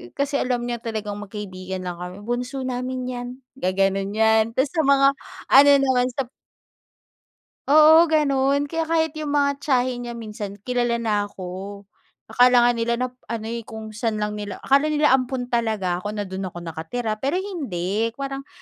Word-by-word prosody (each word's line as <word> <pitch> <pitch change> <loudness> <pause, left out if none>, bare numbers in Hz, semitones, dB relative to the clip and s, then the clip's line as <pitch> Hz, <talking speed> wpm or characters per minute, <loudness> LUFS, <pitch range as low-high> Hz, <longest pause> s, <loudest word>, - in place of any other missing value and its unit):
Kasi 280 0 0
alam 250 -1 0
niya 240 0 -2
talagang 215 -3 -4
magkaibigan 190 -3 -6
lang 175 -1 -5
kami. 180 +3 -7
"Bunso 250 +3 -3
namin 255 0 -3
yan", 245 -1 -5 0.3
gagano'n 195 0 0
yan 220 0 +4
tapos 265 +3 +1
sa 320 -3 +1
mga 275 0 +5 0.4
ano 280 +2 +8
naman, 255 -2 +2
sa 260 -2 -3 1.4
Oo, 310 +3 +7
gano'n. 280 -2 +2
Kaya 325 +2 -2
kahit 320 -2 +1
yung 295 -1 -2
mga 280 -1 +1
tiyahin 250 -3 0
niya 235 - -5
minsan, 210 -3 -6
kilala 240 -1 0
na 210 -3 0
ako. 195 +2 -8 0.5
Akala 245 +1 +5
nga 245 - +5
nila 235 0 0
na 255 +1 -1 0.2
ano 230 -2 -4
eh, 235 - -3
kung 220 -1 -8
san 225 -2 -1
lang 210 0 -2
nila 205 -2 -5
akala 280 +3 +3
nila 295 -1 +3
ampon 255 -1 -2
talaga 215 -7 0
ako 210 +2 -5
na 205 - -2
do'n 190 0 -5
ako 175 -1 -8
nakatira. 215 +8 -4
Pero 280 +6 -1
hindi, 230 - -2
parang 275 0 -5
240 Hz, 170 wpm, -23 LUFS, 205-275 Hz, 1.4 s, ano